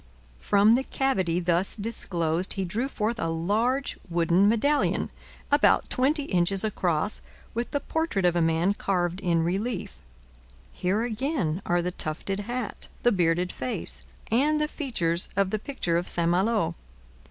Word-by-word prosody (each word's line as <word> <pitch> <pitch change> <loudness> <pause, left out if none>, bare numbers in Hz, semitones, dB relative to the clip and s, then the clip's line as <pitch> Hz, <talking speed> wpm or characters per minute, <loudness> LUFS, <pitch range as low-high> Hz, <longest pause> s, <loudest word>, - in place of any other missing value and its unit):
From 205 +2 +4
the 255 +3 +2
cavity 190 -13 0
thus 175 +1 +1
disclosed 180 -6 0
he 195 -1 -2
drew 220 +9 -1
forth 230 -3 -2
a 165 - -1
large 215 +12 0
wooden 175 +3 +3
medallion, 285 +7 +1 0.4
about 290 0 +3
twenty 285 +4 +2
inches 185 -4 +2
across, 190 -3 0 0.3
with 235 +1 -2
the 285 - -1
portrait 320 - -1
of 175 -1 +3
a 175 - +2
man 165 +4 +2
carved 180 -3 -1
in 170 -4 +1
relief. 195 +5 -2 0.8
Here 195 +5 0
again 230 - -1
are 175 0 +2
the 180 - -1
tufted 180 +4 -2
hat, 240 +2 -2 0.2
the 240 - +5
bearded 175 -2 +1
face, 255 - -4 0.3
and 295 +6 +3
the 300 - +1
features 185 - -1
of 195 -1 +1
the 215 - -1
picture 200 -9 -2
of 175 - -2
St 170 -1 +1
Malo. 200 - +1
195 Hz, 150 wpm, -26 LUFS, 175-240 Hz, 0.8 s, the